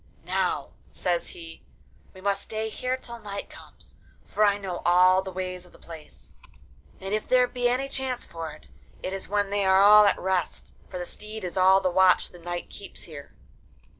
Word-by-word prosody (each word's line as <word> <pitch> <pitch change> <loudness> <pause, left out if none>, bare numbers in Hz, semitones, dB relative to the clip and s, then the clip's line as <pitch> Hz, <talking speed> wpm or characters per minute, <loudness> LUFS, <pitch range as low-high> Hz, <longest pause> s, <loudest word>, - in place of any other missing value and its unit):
'Now,' - - -1 0.2
says 175 -1 -1
he, 165 -1 -11 0.5
'we 185 - -14
must 200 0 0
stay 220 +1 -4
here 255 +3 -2
till 235 -2 -9
night 200 -2 -7
comes; - - -16 0.3
for 215 - 0
I 205 -1 +4
know 190 -3 -5
all 185 +2 +5
the 190 - -7
ways 185 -1 -5
of 180 - -17
the - - -16
place, 160 -2 -12 0.7
and 195 +1 -5
if 215 - -1
there 250 -1 +5
be 245 -1 0
any 255 +2 0
chance 265 -2 -3
for 165 -2 -6
it, 150 - -15 0.4
it 185 - -3
is 195 -1 -5
when 205 -1 0
they 205 0 +1
are 190 0 +5
all 210 +1 +9
at 200 - +3
rest; 185 -2 -2 0.2
for - - -6
the 175 - -4
steed 215 +3 -8
is 180 - -4
all 190 +1 +5
the 185 - +1
watch 185 0 +4
the 175 - -14
knight 175 +1 -5
keeps 200 - -10
there. 145 -4 -11
190 Hz, 195 wpm, -26 LUFS, 180-210 Hz, 0.7 s, all